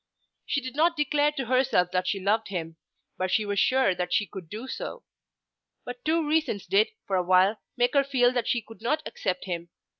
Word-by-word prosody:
She 280 - 0
did 255 0 -7
not 335 +2 +3
declare 295 0 +2
to 270 -3 -3
herself 250 -8 +2
that 185 0 0
she 195 - 0
loved 210 +4 +1
him, 165 -4 -5 0.4
but 185 0 0
she 215 +3 +1
was 205 -1 -1
sure 260 -6 +3
that 180 0 -3
she 210 - +2
could 180 -3 -10
do 220 +7 -7
so. 480 - -6 0.8
But 245 0 -8
two 320 0 +1
reasons 300 -10 0
did 410 +3 +3 0.2
for 195 - -1
a - - +3
while 185 +4 +3 0.2
make 245 0 +2
her 280 -1 +4
feel 255 -3 +3
that 245 -2 -1
she 240 -2 0
could 225 +1 -14
not 305 +7 0
accept 185 -2 -3
him. 170 -2 -4
235 Hz, 210 wpm, -27 LUFS, 190-280 Hz, 0.8 s, her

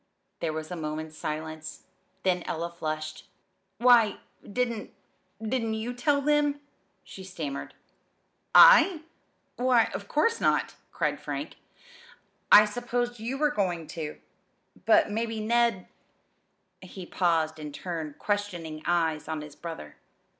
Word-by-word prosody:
There 165 - -1
was 155 +2 -6
a - - -3
moment's 155 -1 -5
silence; 155 +1 -6 0.4
then 180 -2 +1
Ella 170 +1 -3
flushed. 155 -2 -5 0.5
"Why! 235 -2 +5 0.2
didn't 235 0 -3 0.5
didn't 225 0 -1
you 225 +3 -4
tell 280 +4 +1
them?" 295 0 +2 0.4
she 190 - -11
stammered. 160 -7 -6 0.8
"I? 385 -10 +8 0.5
Why, 245 -2 +3
of 200 - -6
course 455 - +1
not!" - - +1 0.2
cried - - -1
Frank. - - -5 0.9
"I 210 - +10
supposed 240 +2 -3
you 240 +5 -3
were 300 +1 +2
going 180 - -1
to. 155 -3 -5 0.7
But 325 -9 +5
maybe 225 +1 -2
Ned 230 -3 +1 0.5
" - - -47
He 185 0 -9
paused 165 -3 0
and 150 -1 -6
turned 160 -2 -6
questioning 175 -7 -3
eyes 165 -3 +1
on 160 -1 -3
his 150 -1 -10
brother. 165 - -8
190 Hz, 125 wpm, -27 LUFS, 160-240 Hz, 0.9 s, I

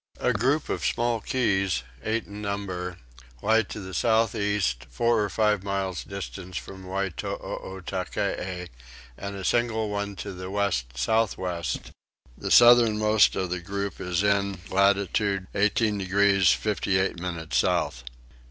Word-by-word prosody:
A 125 - +2
group 135 +8 +1
of - - -3
small 120 -1 +1
keys, 95 - 0 0.2
eight 110 +1 -1
in 105 +1 -9
number, 95 -3 -4 0.5
lie 110 +1 +4
to 105 - -7
the 95 -2 -8
south 110 +3 +2
east, 100 - -1
four 115 - +2
or 105 - -2
five 105 -2 +2
miles 95 -2 -2
distant 95 -2 -7
from 95 +2 -7
Wytootackee 95 -1 -4 0.5
and 100 +5 -6
a 95 -1 -6
single 110 -2 +1
one 100 0 -3
to 100 +2 -6
the 90 0 -7
west 90 -13 -1
south 110 - +1
west; 85 -7 -3 0.4
the - - -5
southernmost 110 -3 +6
of 95 -2 -2
the 90 - -1
group 100 +2 -4
is 90 +1 0
in 100 -1 +1
latitude 100 0 +2
18 105 +1 +2
degrees 100 -1 +3
58 95 -3 +1
minutes 85 -3 -3
south. - - 0
100 Hz, 135 wpm, -26 LUFS, 95-105 Hz, 0.5 s, southernmost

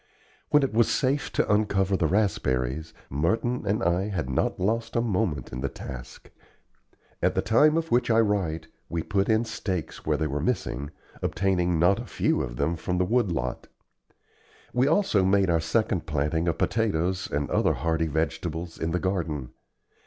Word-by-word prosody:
When 150 -1 +5
it 135 - -1
was 115 +1 +4
safe 140 +1 0
to - - +1
uncover 100 -2 +2
the 85 -4 +1
raspberries, 80 - 0 0.2
Merton 110 - 0
and 100 +2 +1
I 90 +3 +1
had 80 -10 -3
not 65 - 0
lost 115 +4 -1
a - - +3
moment 95 - -1
in 65 - -4
the 70 - -1
task. 60 -1 -9 0.9
At - - +2
the - - +2
time 150 +8 +4
of 165 -1 -2
which 120 0 +2
I 115 0 +4
write 95 -7 0 0.2
we 85 -1 -2
put 100 +3 0
in 110 +1 +3
stakes 95 -7 -4
where - - +1
they 80 - -1
were 75 -1 -2
missing, 70 - -2 0.3
obtaining 90 -2 +1
not 90 +4 +4
a - - -7
few - - +1
of - - -4
them 75 +7 0
from 90 +3 -2
the 90 - +2
wood 115 -1 +1
lot. 65 -6 -3 1.1
We 125 +2 +3
also 155 - +3
made 95 -1 +3
our 80 -1 +2
second 90 +1 0
planting 75 +3 0
of 85 - 0
potatoes 95 -5 0
and 70 0 -1
other - - +3
hardy 80 0 0
vegetables 80 +2 -3
in 80 - -1
the 90 - +1
garden. 80 -9 -2
90 Hz, 175 wpm, -26 LUFS, 80-110 Hz, 1.1 s, When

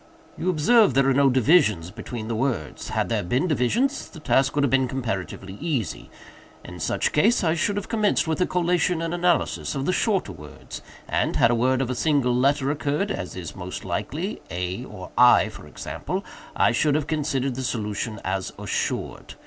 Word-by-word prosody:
"You 185 - -2
observe 185 - +4
there 135 0 +4
are 135 - +4
no 140 +1 +4
divisions 125 - +3
between 110 +1 -7
the 115 - -2
words. 130 +1 -2
Had - - 0
there - - 0
been 125 - 0
divisions, 220 - 0
the 160 - -11
task 135 -2 +2
would 145 - +2
have 140 - +1
been 135 -1 +3
comparatively 100 -6 -4
easy. 145 - -3 0.6
In 90 0 -9
such - - 0
case 210 +9 +3
I 160 -2 +2
should 170 +5 0
have 205 - -3
commenced 215 -6 +1
with 160 +3 -1
a - - +3
collation 180 -1 +1
and 165 0 -2
analysis 175 -3 0
of 135 0 -2
the 185 - +1
shorter 195 - 0
words, 75 -5 -10 0.3
and, - - 0
had 115 - +4
a - - +3
word 130 +3 +2
of 125 - -3
a - - 0
single 135 -3 +1
letter 140 +2 +2
occurred, 150 +7 -1
as 90 - -5
is 85 -5 -7
most 90 0 -7
likely, 150 - -3
(a 90 +2 -4
or - - -10
I, - - +6
for - - -12
example,) - - -5 0.3
I - - +4
should 145 +5 +2
have 150 -2 0
considered 145 -4 -1
the 130 - -5
solution 110 -3 -3
as 95 -1 -2
assured. - - -3
135 Hz, 190 wpm, -24 LUFS, 115-165 Hz, 0.6 s, I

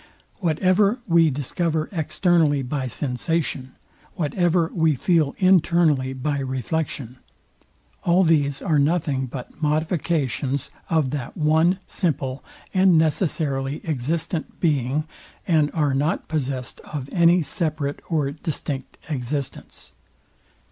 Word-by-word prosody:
Whatever 185 +5 +2
we 165 -2 +4
discover 155 +3 -1
externally 160 -4 +2
by 130 +1 -2
sensation; 130 +1 -2 0.4
whatever 170 +1 +1
we 160 -3 +2
feel 155 0 +1
internally 170 -7 +3
by 140 +2 -2
reflection; 130 -1 -3 0.9
all 180 +2 +4
these 145 -5 +2
are 155 -5 +2
nothing 145 -3 +1
but 125 +4 -9
modifications 150 -4 0 0.2
of 155 -6 +1
that 140 -5 -5
one, 160 +4 +3
simple, 135 -7 -2 0.3
and 185 -2 +5
necessarily 150 -4 0
existent 160 +3 -2
being, 145 -2 +1 0.4
and 155 -4 +3
are 150 -4 +2
not 145 +5 0
possest 135 -5 -3
of 145 -4 -6
any 170 -1 +4
separate 150 -2 -2
or 150 -5 0
distinct 145 -3 -5
existence. 135 -2 -5
155 Hz, 105 wpm, -23 LUFS, 135-170 Hz, 0.9 s, and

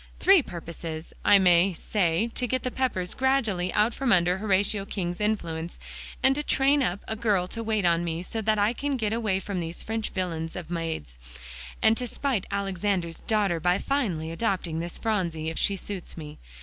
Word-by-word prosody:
Three 385 -2 +6
purposes, 165 - -7
I 205 - +7
may 180 0 +5
say 175 +2 0
to 250 - 0
get 255 +1 -1
the 255 - -2
Peppers 190 -10 -1
gradually 230 -9 +1
out 215 +3 +2
from 265 -1 0
under 180 0 +4
Horatio 200 0 +1
King's 180 -2 -4
influence, 170 -6 -2 0.5
and 265 - +5
to 295 - -2
train 280 0 +3
up 200 -6 -1
a 220 - -2
girl 210 -5 +1
to 230 - -5
wait 215 -3 0
on 170 0 +3
me 170 0 -3
so 225 +4 -4
that 215 0 +1
I 205 +3 +2
can 280 +2 -2
get 220 -2 -1
away 215 -5 0
from 195 -1 -4
these 165 0 -5
French 220 0 -3
villains 165 -4 -3
of 175 -2 -7
maids, 160 - -4 0.6
and 220 0 +6
to 250 - -2
spite 240 -5 -1
Alexander's 195 -3 -1
daughter 205 -6 +1
by 180 +3 +2
finally 195 - -1
adopting 175 -4 -1
this 170 +1 -2
Phronsie 170 -8 -1
if - - -5
she 200 - +2
suits 190 -2 -6
me. 150 -1 -8
195 Hz, 190 wpm, -27 LUFS, 170-225 Hz, 0.6 s, I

